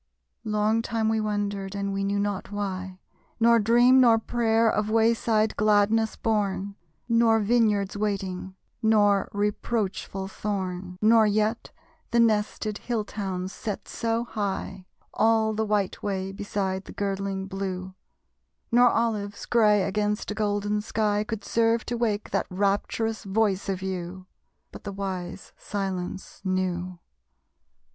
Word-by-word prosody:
Long 215 +1 +1
time 225 -1 -1
we 220 0 +1
wondered 205 -2 -2
(and 200 0 -2
we 195 0 -1
knew 200 +1 0
not 200 -1 -2
why): 190 -2 -4 0.4
Nor 235 0 +5
dream, 240 +4 +5
nor 235 -3 +6
prayer, 225 0 +1
of 215 -1 +1
wayside 220 -1 +2
gladness 215 +1 +3
born, 200 -2 -1 0.3
Nor 230 -1 +4
vineyards 210 -3 +2
waiting, 190 -3 -3 0.3
nor 205 -3 +3
reproachful 205 -2 -2
thorn, 185 -3 -4
Nor 220 0 +6
yet 215 +2 0 0.4
the 235 - +2
nested 215 -1 +1
hill 230 -4 -2
towns 190 -3 -4
set 210 -3 -5
so 230 0 -1
high 195 -4 -4 0.3
All 220 0 +3
the 220 0 -1
white 205 -2 0
way 195 -2 -2
beside 195 -1 -3
the - - -10
girdling 195 -1 -2
blue, 190 -1 -4 0.8
Nor 245 +1 +6
olives, 210 -4 -1
gray 210 -4 +4
against 210 +2 -1
a - - -1
golden 205 0 0
sky, 210 -1 0
Could 215 -2 -5
serve 230 0 +2
to 240 - -2
wake 220 -3 -1
that - - 0
rapturous 205 +4 -1
voice 200 -1 0
of 190 -1 -2
you! 185 0 -5 0.5
But - - -11
the 200 - -5
wise 190 -2 -5
silence 190 -2 -5
knew. 185 -1 -2
205 Hz, 130 wpm, -26 LUFS, 195-220 Hz, 0.8 s, nor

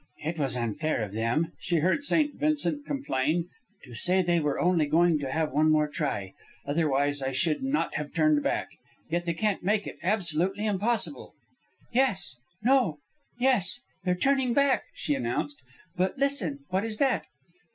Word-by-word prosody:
"It 160 +2 -3
was 135 -3 -1
unfair 120 +3 -1
of 105 - -5
them," 120 +10 0
she 175 - -1
heard 185 - +1
St. 295 0 +2
Vincent 295 -1 0
complain, 170 - -1 0.3
"to 125 - -12
say 185 +10 +3
they 170 -1 +2
were 150 -2 -1
only 175 -4 +2
going 165 +1 +3
to 135 -2 -4
have 160 +1 0
one 155 +3 +3
more 150 -1 +3
try. 105 - -3 0.3
Otherwise 145 -1 +1
I 135 0 -1
should 150 +4 0
not 270 +3 0
have 150 0 -4
turned 155 -3 +3
back. - - -1 0.4
Yet 175 +1 0
they 170 -1 -1
can't 210 +2 0
make 205 +3 +1
it - - -8
absolutely 190 +1 +1
impossible." 220 +6 0 0.6
"Yes... 190 - +1 0.2
No... 245 - +3 0.4
Yes! 245 -4 +2 0.2
They're 180 -1 +1
turning 265 +3 +1
back," 280 -1 +3
she 150 - -1
announced. 135 +2 -2 0.3
"But 185 +7 0
listen! 255 - -1
What 190 +2 0
is 220 -1 -3
that?" 270 -1 +1
170 Hz, 160 wpm, -28 LUFS, 145-220 Hz, 0.6 s, say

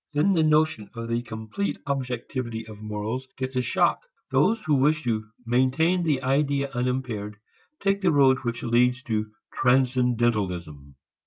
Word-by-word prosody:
Then 155 +7 +3
the 165 - +3
notion 155 -9 +2
of 115 0 -5
the 115 0 0
complete 110 - -4
objectivity 125 -3 -3
of 110 -1 -11
morals 110 +5 -4
gets 130 0 -4
a 125 - +2
shock. 115 - +2 0.3
Those 225 +1 +3
who 155 - +1
wish 150 +3 +3
to 110 -3 -1 0.2
maintain 130 +9 +2
the 150 -6 0
idea 140 +1 +1
unimpaired 120 -4 -2 0.5
take 195 0 +1
the 185 -3 +3
road 135 -3 +5
which 115 -2 -4
leads 125 +2 +2
to 110 -3 -1 0.3
transcendentalism. 120 - +1
125 Hz, 145 wpm, -25 LUFS, 115-140 Hz, 0.5 s, road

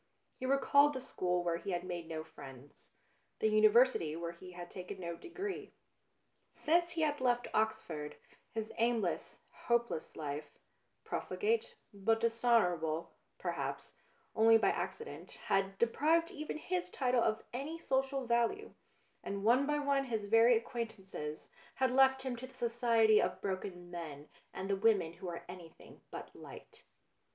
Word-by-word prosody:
He 255 - -3
recalled 280 +2 +5
the 260 - -3
school 180 -8 -1
where 170 -1 0
he 185 - -7
had 175 0 -2
made 175 -2 -5
no 160 -1 -4
friends, 135 -3 -13 0.5
the 220 - +2
Uni 215 0 +6
versity 210 -9 +3
where 170 0 -3
he 180 +2 -12
had 175 0 -8
taken 185 +1 -7
no 170 -2 -4
degree. 375 - -6 0.8
Since 345 +2 +1
he 330 - -1
had 295 -3 +1
left 245 -1 +2
Oxford, 160 -9 -1 0.4
his 220 -1 -4
aimless, 230 -5 0
hopeless 235 -8 -1
life, 150 -1 -5 0.5
profligate, 455 +3 -1 0.2
but 225 +3 +1
dishonourable, 210 -9 +1 0.2
perhaps, - - -4 0.4
only 225 +1 +7
by 225 - +3
accident, 460 - -5
had 195 0 +1
deprived 320 - +2
even 305 -4 -5
his 360 +3 -2
title 250 -3 +1
of 220 -1 +1
any 285 +6 -4
social 270 -3 0
value, 235 - 0 0.5
and 200 0 -4
one 250 +6 +4
by 295 0 +1
one 280 -1 +1
his 220 -5 -2
very 225 +3 +6
acquaint 230 0 -3
238 190 -5 -9
BLUE 150 0 -3
BLOOD - - -17
ances - - -17 0.3
had 260 -2 +2
left 265 0 +4
him 260 -2 -2
to 255 +2 -7
the 265 - -19
society 230 -2 +4
of - - -1
broken 185 -2 -4
men 155 -4 -7 0.2
and 190 - -5
the 200 - +1
women 195 -5 +2
who 185 +2 -8
are 170 - -7
anything 175 -2 -12
but - - -8
light. - - -12
225 Hz, 160 wpm, -34 LUFS, 180-265 Hz, 0.8 s, only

